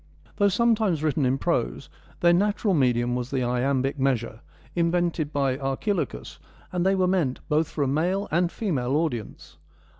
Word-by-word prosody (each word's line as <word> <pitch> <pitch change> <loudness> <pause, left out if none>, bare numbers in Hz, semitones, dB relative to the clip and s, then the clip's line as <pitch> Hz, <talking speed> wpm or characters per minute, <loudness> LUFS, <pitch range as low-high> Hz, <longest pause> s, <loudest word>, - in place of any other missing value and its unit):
Though 205 - +4
sometimes 210 -5 +2
written 145 -3 +1
in 130 +2 +1
prose, 65 - -1 0.3
their 175 0 +5
natural 205 +2 +1
medium 120 -5 +2
was 125 0 -3
the 135 -2 -1
iambic 130 +3 0
measure, 120 -4 -1 0.3
invented 170 -3 0
by 135 -2 0
Archilochus, 135 - -3 0.3
and 180 -1 -1
they 190 +1 +3
were 185 -1 +2
meant 175 -9 0
both 155 +1 +1
for 145 - -2
a - - 0
male 175 +8 0
and 170 +2 +1
female 140 - -1
audience. 115 - -3
150 Hz, 155 wpm, -25 LUFS, 130-180 Hz, 0.3 s, their